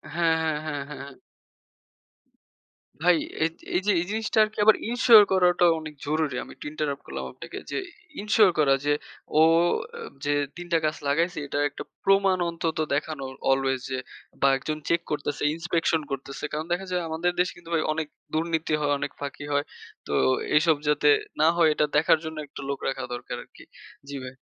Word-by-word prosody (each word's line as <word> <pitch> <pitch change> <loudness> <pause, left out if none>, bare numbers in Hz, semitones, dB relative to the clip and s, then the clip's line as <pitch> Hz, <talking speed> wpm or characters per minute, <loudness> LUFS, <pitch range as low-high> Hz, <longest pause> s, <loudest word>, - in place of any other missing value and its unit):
হ্যাঁ, 165 -1 +3
হ্যাঁ, 155 -2 0
হ্যাঁ, 145 -2 -3
হ্যাঁ। 140 -2 -9 1.9
ভাই 175 -1 +6 0.3
এই 165 +2 -2
য - - -7
এই - - -3
জিনিসটা 220 0 -2
আরকি 215 0 -4
আবার 220 - +8
ensure 235 -3 +8
করাটা 180 -1 +4
অনেক 155 -1 -8
জরুরি। 155 -3 0
আমি - - -12
একটু - - -11
interrupt 150 -2 -3
করলাম - - -5
আপনাকে - - -9
যে, - - -2 0.4
e - - -4
ensure 210 -2 +4
করা 135 -2 +5
যে, 145 - +3 0.5
ও - - +7 0.8
যে 145 - +2 0.2
৩ 175 0 -7
টা 165 - +5
গাছ 155 0 0
লাগাইছে 170 +5 +1
এটার 145 +1 0
একটা 140 - -8 0.2
প্রমাণ 195 -1 +4
অন্তত 165 -1 -3 0.2
দেখানো 150 -1 -3 0.3
অলওয়েজ 135 -1 +1
যে 130 - -1 0.4
বা 140 - +5
একজন 155 +3 -4
চেক 170 0 +2
করতেছে, 145 -1 -2
inspection 165 -1 0
করতেছে। 135 +1 -5
কারণ 155 +1 -2
দেখা 190 +2 -2
যায় 180 -1 0
আমাদের 170 +3 0
দেশে 180 -1 +1
কিন্তু 170 -1 -14
ভাই 160 - +2
অনেক 160 -1 -3 0.3
দুর্নীতি 160 0 -1
হয়, 145 - +1
অনেক 145 - -3
ফাঁকি 145 0 -5
হয়। 145 0 +1 0.4
তো - - -3 0.4
এসব 160 +1 +4
যাতে 150 0 +3 0.3
না 155 - +6
হয়, 165 -2 +5
এটা 150 - +2
দেখার 160 +2 +5
জন্য 160 0 -6
একটা 140 - -9
লোক 140 - -2
রাখা 135 - -2
দরকার 120 - -5
আরকি। - - -17 0.5
জি, 140 - -5
ভাই। 130 - -7
160 Hz, 175 wpm, -26 LUFS, 145-175 Hz, 1.9 s, আবার